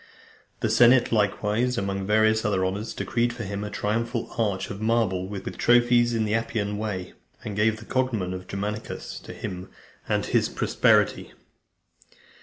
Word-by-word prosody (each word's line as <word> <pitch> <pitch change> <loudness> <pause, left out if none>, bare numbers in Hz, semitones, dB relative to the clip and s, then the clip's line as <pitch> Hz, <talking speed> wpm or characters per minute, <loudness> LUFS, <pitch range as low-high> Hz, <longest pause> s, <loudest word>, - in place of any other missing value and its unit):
The - - +1
senate 120 +1 +5
likewise, 110 +3 +1
among 100 0 -2
various 110 +1 +3
other 95 -3 +1
honours, 100 +4 -3
decreed 120 0 0
for 120 -1 -6
him 100 0 -4
a 105 - -4
triumphal 115 +3 -2
arch 105 -5 -1
of 100 +1 -7
marble, 110 -5 +1
with 100 -1 -6
trophies, 120 0 +4
in 110 -1 +1
the 105 - -1
Appian 105 -2 -1
Way, 95 -4 -4 0.3
and 105 - -5
gave 110 +1 +2
the 110 - -12
cognomen 115 -9 -1
of 90 0 -7
Germanicus 105 +2 -5
to - - -11
him 90 0 -6 0.4
and - - +1
his - - +1
posterity. - - +2
105 Hz, 155 wpm, -25 LUFS, 100-115 Hz, 0.4 s, senate